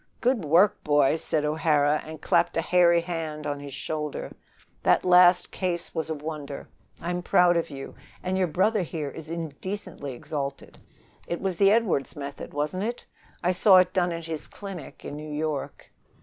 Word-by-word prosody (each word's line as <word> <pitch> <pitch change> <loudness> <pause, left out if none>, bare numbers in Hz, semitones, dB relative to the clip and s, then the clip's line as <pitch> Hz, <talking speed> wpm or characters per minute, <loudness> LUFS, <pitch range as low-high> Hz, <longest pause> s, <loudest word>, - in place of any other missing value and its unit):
"Good 245 -5 +1
work, 175 +7 +4
boy!" 145 -1 +3
said 155 -1 -1
O'Hara, 150 -1 +2
and 155 0 -9
clapped 175 - +2
a - - +3
hairy 170 0 +4
hand 160 -3 -4
on 145 0 -2
his 140 -1 -8
shoulder. 150 -1 -4 0.5
"That - - +3
last 180 0 +6
case 175 -2 -2
was 160 0 -2
a 160 - -1
wonder. 150 -2 -6 0.3
I'm 175 +1 -3
proud 175 0 +4
of 170 0 0
you, 135 -2 -8 0.3
and 185 +1 -1
your 190 -1 +2
brother 195 +6 +2
here 155 -4 -4
is 160 +2 -9
indecently 165 -1 -5
exalted. 140 +2 -5 0.5
It 170 - -3
was 190 -3 -2
the 195 +1 +5
Edwardes 210 -10 +1
method, 140 -1 -7
wasn't 150 +7 -2
it? 240 +2 -4 0.4
I 180 - +3
saw 190 +1 +6
it 185 0 +4
done 180 -2 +1
at 165 -1 -5
his 160 -2 -4
clinic 195 -7 -9
in - - -5
New 150 0 -7
York." 150 -1 -4
165 Hz, 175 wpm, -26 LUFS, 150-180 Hz, 0.5 s, last